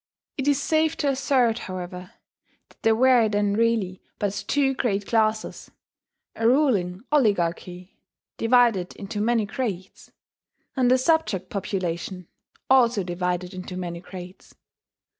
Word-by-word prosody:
It 270 0 -3
is 285 -1 +3
safe 315 +2 +1
to 290 - 0
assert, 260 -4 +1
however, 180 0 -7 0.6
that - - -25
there 225 0 +3
were 245 -2 +4
then 205 -1 +1
really 215 -4 0 0.2
but 205 -1 -3
two 275 -2 +2
great 205 -6 -1
classes, 220 -1 -1 0.7
a 225 - +1
ruling 225 -9 +2
oligarchy, 180 - 0 0.4
divided 225 -6 +2
into 205 +1 -5
many 230 0 +1
grades; 205 -5 -5 0.6
and 250 -2 +3
a 255 - +6
subject 260 - 0
population, 180 -2 -4 0.4
also 240 -5 +4
divided 180 +1 -3
into 185 0 -7
many 175 -2 -5
grades. 180 0 -11
210 Hz, 120 wpm, -24 LUFS, 185-250 Hz, 0.7 s, a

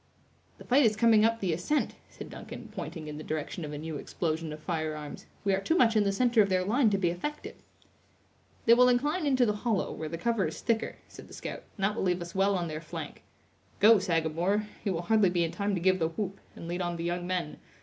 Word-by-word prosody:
"The - - -12
fight 270 +4 +4
is 220 -3 +4
coming 220 0 +5
up 230 +1 +2
the 185 -4 +1
ascent," 180 - 0 0.2
said - - -10
Duncan, 225 -2 -9
pointing 165 -3 -6
in 150 0 -6
the - - -7
direction 155 +2 -4
of 150 - -5
a 145 - -5
new 155 0 -5
explosion 160 +1 -3
of 150 - -7
firearms; 155 -2 -4 0.2
"we 200 -1 +2
are 190 - +1
too 320 - +1
much 230 -6 +4
in 210 -1 +4
the 200 - +2
center 235 +2 +3
of 200 - +2
their 185 -1 +1
line 235 +3 +3
to 200 - +1
be 180 -3 +1
effective." 295 +13 -5 1.1
"They 230 - +7
will 250 +1 +6
incline 295 +7 +1
into 260 -3 +4
the 210 -2 0
hollow, 220 -3 0
where 155 - -5
the 165 - -4
cover 225 -1 0
is 155 - -6
thicker," 230 -1 -1
said - - -12
the - - -11
scout, - - -7
"and 195 - -5
that 205 +2 +2
will - - -2
leave 180 -1 +1
us 170 - -10
well 195 +1 +2
on 175 -1 -2
their 155 0 -5
flank. - - -7 0.6
Go, 215 +1 +7
Sagamore; 175 +4 0 0.2
you 200 - 0
will 170 -2 -2
hardly 215 0 +4
be 175 -1 +1
in 165 - -1
time 200 -1 -1
to - - -1
give 185 +2 +3
the 160 - +2
whoop, 195 +3 -4 0.2
and 165 - -8
lead 175 +2 -3
on 175 -1 -2
the 165 - -4
young 175 +1 -2
men. 180 -4 -2
190 Hz, 245 wpm, -29 LUFS, 165-220 Hz, 1.1 s, They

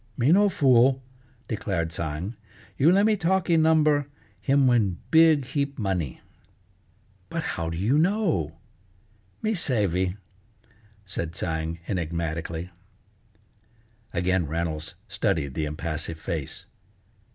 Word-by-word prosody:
"Me 130 +5 +3
no 205 +3 +5
fool," 130 -4 +4 0.5
declared 95 -7 -2
Tsang. 85 +6 -4 0.4
"You 150 +5 +5
le' 195 +2 +4
me 215 0 +4
talkee 185 -2 +1
number, 155 -3 +4 0.3
him 140 0 +3
win 110 -8 +3
big 160 -4 +6
heap 140 +1 -2
money." 95 - -2 1.1
"But - - -3
how 85 -1 -3
do 85 - -4
you 115 - +2
know?" 170 - +1 0.9
"Me 220 - +1
savey," 100 - 0 0.9
said 85 -3 -4
Tsang 80 0 -2
enigmatically. 85 -1 -3 1.4
Again 90 -1 +1
Reynolds 80 0 -3
studied 70 -4 -1
the 80 - -1
impassive 80 +1 -4
face. 80 -4 -5
95 Hz, 105 wpm, -26 LUFS, -, 1.4 s, big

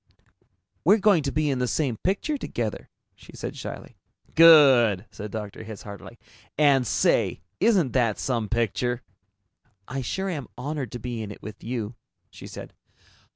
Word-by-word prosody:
"We're 200 +7 +6
going 200 -5 +4
to 140 -1 -2
be 150 0 +1
in 130 - -1
the 125 - 0
same 130 -1 -1
picture 200 - -1
together," 120 - -4 0.3
she - - -16
said - - -6
shyly. - - -8 0.4
"Good!" 135 - +7
said 105 - -7
Dr. 105 0 -6
Hitz 110 -2 -9
heartily. 100 +3 -10 0.4
"And, 140 -4 +4
say, 95 - +1 0.2
isn't 190 - +3
that 115 -5 +2
some 115 -5 -2
picture?" 120 +2 -1 0.8
"I 135 +1 -4
sure 190 +10 -3
am 150 - -4
honored 140 -1 -4
to 120 - -5
be 120 -2 -5
in 105 - -5
it 105 - -11
with 105 0 -9
you," 115 -1 -4 0.4
she - - -11
said. - - -9
125 Hz, 155 wpm, -25 LUFS, 110-150 Hz, 0.8 s, Good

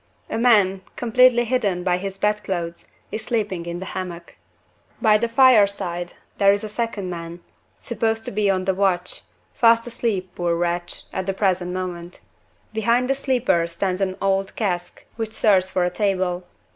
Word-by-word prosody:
A - - -1
man, 205 -6 +4
completely 245 +1 +4
hidden 205 -7 0
by 180 -1 +2
his 195 0 -5
bedclothes, 190 -5 -2 0.2
is 220 - -4
sleeping 205 -7 -2
in 170 0 -4
the 190 - -6
hammock. 175 -3 -6 0.6
By 215 -3 +4
the 235 - 0
fireside 200 -8 +3 0.3
there 200 -1 +6
is 200 +1 0
a 215 - -5
second 215 -3 -3
man 170 0 -7 0.4
supposed 225 -1 -2
to - - -4
be 205 0 +1
on 185 -1 +1
the 190 - +2
watch 185 -2 0 0.3
fast 230 -1 +4
asleep, 220 -6 -2
poor 175 -1 0
wretch! 175 0 -1
at 190 0 -3
the 195 - -1
present 185 -3 0
moment. 180 -1 -5 0.5
Behind 235 +3 +2
the 270 - +2
sleeper 255 -11 +1
stands 185 +3 -2
an 190 -1 -1
old 195 0 0
cask, 180 -5 -3
which 220 -1 -4
serves 190 -4 +3
for 185 -1 0
a 180 - -1
table. 185 -3 -1
195 Hz, 165 wpm, -22 LUFS, 180-220 Hz, 0.6 s, there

